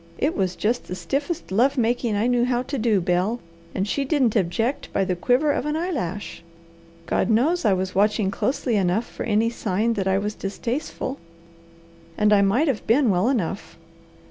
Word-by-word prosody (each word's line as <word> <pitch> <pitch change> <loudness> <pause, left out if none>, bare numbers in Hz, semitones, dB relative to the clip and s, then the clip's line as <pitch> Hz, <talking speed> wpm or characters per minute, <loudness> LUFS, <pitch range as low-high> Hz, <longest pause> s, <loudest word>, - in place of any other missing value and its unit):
It 295 +5 0
was 185 -2 -1
just 230 +7 -1
the 180 - -4
stiffest 275 - -3
love 245 +9 +2
making 235 -2 +1
I 205 +3 +1
knew 245 -1 +2
how 245 0 0
to 275 +1 -4
do, 215 -4 +2
Bel, 180 +7 0 0.4
and 195 +2 -1
she 280 +6 -1
didn't 270 -5 +1
object 225 +8 -1
by 195 - +1
the 185 - -1
quiver 250 - +2
of 285 - -2
an 300 - -1
eyelash. 255 - -3 0.6
God - - 0
knows 265 +9 +2
I 205 - +4
was 185 0 -2
watching 205 0 +2
closely 250 -1 -1
enough 195 +4 +1
for - - -11
any 225 +1 +2
sign 220 +1 0
that 195 -3 -2
I 190 0 +2
was 210 +2 -2
distasteful. 250 +7 -4 1.0
And 210 0 +4
I 200 - +5
might 220 +11 +2
have 260 -7 -2
been 240 0 +4
well 185 +6 +2
enough. 195 -7 -2
225 Hz, 185 wpm, -23 LUFS, 195-255 Hz, 1.0 s, I